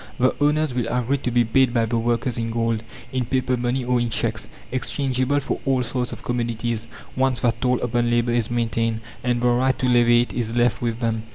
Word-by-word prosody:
The 130 +1 +3
owners 150 -1 +2
will 125 -2 -1
agree 125 +3 0
to 130 - -2
be 120 0 +3
paid 125 +2 +2
by 115 -1 +3
the 115 +1 0
workers 120 +1 0
in 115 0 -2
gold, 115 -1 0 0.3
in 130 -1 0
paper 130 +1 0
money, 125 +1 -1
or 125 0 +2
in 120 0 0
cheques - - -1 0.2
exchangeable 130 +1 0
for 140 - -3
all 130 -2 +1
sorts 125 +1 -2
of - - -8
commodities, 120 -1 -2 0.3
once 130 -2 +1
that 115 -1 0
toll 125 -1 +2
upon 120 0 0
labour 120 0 +2
is 120 -2 0
maintained, 115 -1 -1 0.2
and 120 -1 +1
the 125 - +2
right 130 +2 +2
to - - -1
levy 120 -1 +5
it 120 - -4
is 115 -1 -2
left 120 -1 +2
with 115 0 -2
them. 115 -1 0
120 Hz, 215 wpm, -23 LUFS, 115-130 Hz, 0.3 s, levy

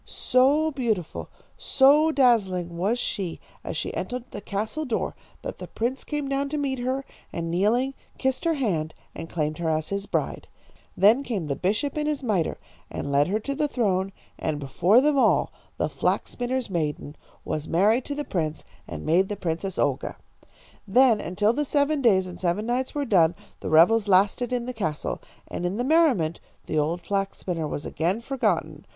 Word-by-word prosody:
"So 285 +5 +2
beautiful, 225 - -2 0.3
so 290 +4 +5
dazzling 195 - +2
was 200 +8 +1
she 190 -7 -3 0.2
as - - -4
she - - -3
entered 250 -1 -3
the - - -6
castle 215 +10 -3
door, 245 -7 -2 0.3
that - - -6
the - - -7
prince 245 +4 -2
came 295 -2 -3
down 275 +1 -1
to 300 - -2
meet 270 -3 -1
her, 260 +2 -2 0.3
and 165 -1 -3
kneeling, 230 +9 +2 0.2
kissed 265 +3 -1
her 330 -1 +2
hand, 170 - -1 0.2
and 165 - -7
claimed 155 -1 -2
her 165 -2 0
as 155 0 -1
his 200 0 -3
bride. - - -2 0.5
Then 215 +8 +6
came 220 - -3
the 140 -2 -2
bishop 220 - -1
in 300 - -1
his 295 -2 -1
mitre, 200 -9 0 0.3
and 140 - -4
led 140 +1 +3
her 205 +4 0
to 280 - -3
the 295 +2 0
throne, 195 -8 0 0.3
and 155 -1 -1
before 170 - +3
them 290 0 +3
all - - +3 0.2
the - - +1
flax - - -1
spinner's 250 +1 -2
maiden 155 -4 -3 0.3
was 155 0 -3
married 215 +9 +3
to 285 - -4
the 295 0 -3
prince, 160 -4 -2 0.2
and 75 0 -7
made 185 +4 +3
the 205 - -2
Princess 180 +1 -3
Olga. - - 0 0.7
"Then, 230 +1 +5
until 205 +6 +1
the 295 +4 0
seven 285 +1 +1
days 195 -7 +4
and 180 -1 -9
seven 185 +4 0
nights 250 +4 -1
were 290 -1 0
done, 175 -7 +4 0.2
the - - -4
revels 200 +8 +5
lasted 200 +6 +3
in 245 -1 -1
the 255 - -4
castle. 160 -10 -3 0.3
And - - -5
in 180 +3 -1
the 245 - 0
merriment 260 - +3 0.3
the 155 - 0
old 165 +4 0
flax 195 +2 -2
spinner 165 -4 -3
was 145 - -5
again 175 +7 -1
forgotten. 270 +2 -1
210 Hz, 185 wpm, -25 LUFS, 175-265 Hz, 0.7 s, Then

